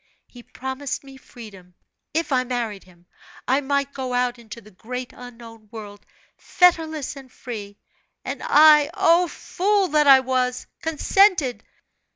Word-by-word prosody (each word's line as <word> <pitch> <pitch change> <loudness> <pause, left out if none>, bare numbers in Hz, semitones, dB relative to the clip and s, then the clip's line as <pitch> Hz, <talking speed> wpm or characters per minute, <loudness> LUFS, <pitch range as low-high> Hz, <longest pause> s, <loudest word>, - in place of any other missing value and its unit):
He 245 - -15
promised 265 +3 -6
me 270 -1 -14
freedom 200 -9 -14 0.4
if 325 0 -2
I 255 -1 +2
married 235 -5 -4
him, 175 -1 -22 0.4
I 265 +3 +2
might 280 0 -1
go 255 -2 -4
out 245 -1 -1
into 230 0 -11
the 215 -1 -18
great 250 +6 -7
unknown 230 -3 -13
world, 205 -2 -11 0.3
fetterless 320 -5 +1
and 265 -2 -13
free; 205 -6 -9 0.5
and - - -5
I, 300 -1 +6
O! 340 +2 +3
fool 395 +3 -1
that 300 -1 +2
I 270 -1 +8
was! 255 -1 -1 0.2
consented. 325 - +2
255 Hz, 140 wpm, -22 LUFS, 230-295 Hz, 0.5 s, I